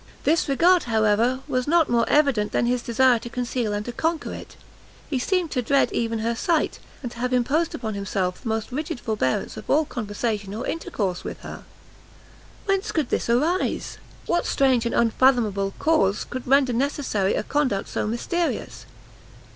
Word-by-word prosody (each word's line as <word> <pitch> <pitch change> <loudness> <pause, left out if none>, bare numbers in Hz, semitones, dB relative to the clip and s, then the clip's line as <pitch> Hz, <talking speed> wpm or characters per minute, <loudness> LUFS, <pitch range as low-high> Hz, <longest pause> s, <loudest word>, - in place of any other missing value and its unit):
This 320 0 +2
regard, 345 +6 +4
however, 225 +3 +2
was 255 -2 -1
not 330 0 +4
more 235 -1 +1
evident 275 -8 +2
than - - +2
his 245 0 +1
desire 240 +1 +3
to 240 - -8
conceal 240 -2 -2
and 205 0 -3
to 240 - -4
conquer 325 +6 -2
it; - - -10 0.6
he 265 - +1
seemed 360 +4 0
to 255 - 0
dread 275 +3 +2
even 230 -1 -1
her 235 - +1
sight, 320 +7 0 0.2
and 245 - -4
to 235 - -11
have 250 +1 -1
imposed 280 +7 +1
upon 220 -3 -4
himself 195 -2 -2
the - - -7
most 220 +2 -2
rigid 290 -1 -3
forbearance 210 - -1
of - - -10
all 305 +2 +3
conversation 210 -3 -3
or 235 - -4
intercourse 195 - -3
with - - -7
her. - - -9 1.0
Whence 390 -1 0
could 305 -6 -1
this - - -1
arise? 310 +10 0 0.3
what 345 - 0
strange 260 -4 +2
and - - -2
unfathomable 225 -5 +2
cause 245 -11 +2
could 255 0 -7
render 270 -1 +4
necessary 240 -6 0
a - - -1
conduct 265 -9 0
so - - -2
mysterious? 335 +10 -2
245 Hz, 170 wpm, -24 LUFS, 220-290 Hz, 1.0 s, regard